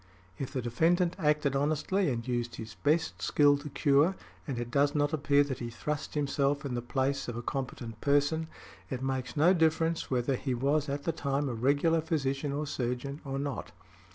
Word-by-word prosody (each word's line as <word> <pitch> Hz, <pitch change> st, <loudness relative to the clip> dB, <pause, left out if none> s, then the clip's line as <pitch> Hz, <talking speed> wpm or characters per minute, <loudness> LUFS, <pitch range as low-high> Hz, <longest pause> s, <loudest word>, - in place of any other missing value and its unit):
If 135 Hz, -, -4 dB
the 130 Hz, -4 st, -3 dB
defendant 170 Hz, +9 st, +2 dB
acted 150 Hz, -2 st, +2 dB
honestly 155 Hz, +6 st, +1 dB
and 120 Hz, -1 st, -3 dB
used 120 Hz, -1 st, -2 dB
his 110 Hz, +1 st, -8 dB
best 160 Hz, +2 st, 0 dB
skill 145 Hz, -1 st, +4 dB
to 150 Hz, +1 st, -7 dB
cure, 145 Hz, +6 st, +3 dB, 0.3 s
and 135 Hz, -4 st, -3 dB
it 120 Hz, 0 st, -4 dB
does 145 Hz, +2 st, +2 dB
not 145 Hz, 0 st, +1 dB
appear 145 Hz, -1 st, +3 dB
that 135 Hz, -3 st, -4 dB
he 120 Hz, -, -4 dB
thrust 150 Hz, +7 st, -4 dB
himself 140 Hz, 0 st, 0 dB
in 135 Hz, -, -3 dB
the 120 Hz, -, -1 dB
place 135 Hz, +3 st, -1 dB
of 120 Hz, -1 st, -4 dB
a 120 Hz, -, -5 dB
competent 120 Hz, -4 st, -5 dB
person, 145 Hz, +3 st, +2 dB, 0.4 s
it 130 Hz, -1 st, -4 dB
makes 130 Hz, 0 st, -2 dB
no 170 Hz, +5 st, +6 dB
difference 160 Hz, -1 st, +1 dB
whether 130 Hz, +1 st, +1 dB
he 130 Hz, 0 st, -2 dB
was 140 Hz, +4 st, +1 dB
at 140 Hz, +1 st, -3 dB
the 165 Hz, -, 0 dB
time 140 Hz, -2 st, -1 dB
a 130 Hz, -, -2 dB
regular 145 Hz, +7 st, +2 dB
physician 145 Hz, -3 st, -1 dB
or 145 Hz, +2 st, -2 dB
surgeon, 135 Hz, +2 st, -3 dB
or 135 Hz, -2 st, -4 dB
not. 140 Hz, -7 st, -4 dB
140 Hz, 190 wpm, -30 LUFS, 130-150 Hz, 0.4 s, no